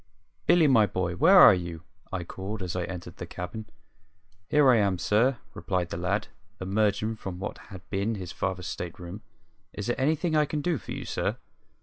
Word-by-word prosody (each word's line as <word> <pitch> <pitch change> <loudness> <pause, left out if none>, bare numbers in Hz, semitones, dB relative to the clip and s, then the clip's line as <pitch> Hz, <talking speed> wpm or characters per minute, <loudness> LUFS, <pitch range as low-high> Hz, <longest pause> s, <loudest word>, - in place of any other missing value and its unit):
"Billy, 170 -2 +6
my 115 -7 +5
boy, 95 -2 -2
where 175 - +6
are 180 - +10
you?" 85 -3 -4 0.3
I 95 -3 -3
called, 95 +4 -6
as 90 -1 -4
I 90 -1 -1
entered 90 -2 -8
the 85 - -6
cabin. 90 +6 -6 0.8
"Here 150 -2 +5
I 120 - +5
am, 100 -3 +2
sir," 115 +8 +2 0.2
replied 90 -3 -2
the - - -4
lad, 95 +5 -1 0.3
emerging 105 +3 0
from 95 -4 -6
what 95 - -5
had 95 -3 -11
been 105 +3 0
his 90 -3 -6
father's 95 -1 -3
state 85 -1 -5
room. 90 +4 -8 0.5
"Is 105 - -5
there 120 +3 -1
anything 155 +3 +1
I 150 -1 +4
can 150 +1 -3
do 170 -3 0
for 95 - -10
you, - - -5
sir?" - - -2
100 Hz, 195 wpm, -27 LUFS, 90-120 Hz, 0.8 s, are